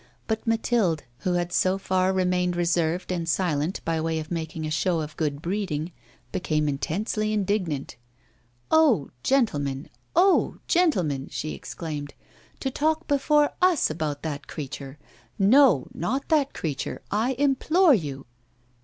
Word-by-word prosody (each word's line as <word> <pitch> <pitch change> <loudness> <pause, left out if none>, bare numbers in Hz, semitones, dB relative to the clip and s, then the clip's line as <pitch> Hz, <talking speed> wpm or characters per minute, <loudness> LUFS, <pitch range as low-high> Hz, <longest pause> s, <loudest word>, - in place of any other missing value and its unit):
But 220 +1 -3
Mathilde, 225 -8 +1 0.2
who 180 +5 -1
had 175 0 -1
so 185 +1 +2
far 185 -1 +1
remained 180 -1 +1
reserved 175 0 0
and 170 -2 -2
silent 165 -1 0
by 165 -1 0
way 160 0 -1
of 155 +1 -5
making 160 -1 -3
a 155 - -3
show 165 +2 +1
of 155 -1 -5
good 150 -1 -2
breeding, 175 -4 -2 0.4
became 155 -3 0
intensely 205 +9 -1
indignant. 190 -11 -1 0.7
'Oh! 290 - +4
gentlemen, 145 - 0 0.2
oh! 370 +3 +4
gentlemen,' 180 - +1
she 155 - -4
exclaimed, 150 -4 -6 0.4
'to 265 - -2
talk 315 +4 0
before 290 +1 +3
us 360 - +3
about 155 -2 -3
that 150 -3 -4
creature. 140 -1 -7 0.4
No, 210 - +5
not 255 - -2
that 295 -4 +2
creature, 145 -5 -4
I 225 +6 +1
implore 290 +6 +3
you! 145 - -2
180 Hz, 135 wpm, -25 LUFS, 155-235 Hz, 0.7 s, No